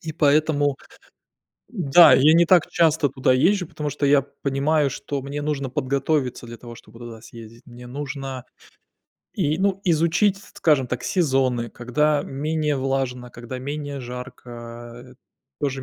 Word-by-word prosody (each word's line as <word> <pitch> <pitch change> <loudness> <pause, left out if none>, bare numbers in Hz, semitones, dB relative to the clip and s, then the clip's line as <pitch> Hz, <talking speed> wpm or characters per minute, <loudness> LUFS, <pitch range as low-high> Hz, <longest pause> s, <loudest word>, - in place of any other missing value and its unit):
И 160 -1 -5
поэтому 145 -2 +2 0.9
да, 175 - +6
я 150 +4 +5
не 170 +1 +5
так 175 -1 +4
часто 160 -4 +2
туда 130 0 +1
езжу, 180 +7 +2
потому 150 -3 -5
что 145 0 -2
я 140 0 +4
понимаю, 140 +2 -1
что 140 +1 -5
мне 140 +2 -5
нужно 145 -3 -3
подготовиться 135 0 -1
для 115 0 -10
того, 120 0 -11
чтобы 115 +1 -16
туда 115 -2 -10
съездить. 115 +1 -13
Мне 120 0 -12
нужно 135 -1 -6 0.9
и, 155 -4 -1
ну, 195 0 0
изучить, 175 +4 +2 0.2
скажем 145 -5 +2
так, 125 0 -4
сезоны, 130 - 0
когда 145 +5 0
менее 150 +1 -2
влажно, 130 -2 -2
когда 120 +2 -8
менее 145 +1 -5
жарко, 125 0 -9
а 120 0 -10 0.5
тоже 135 -2 -2
140 Hz, 145 wpm, -22 LUFS, 125-155 Hz, 0.9 s, да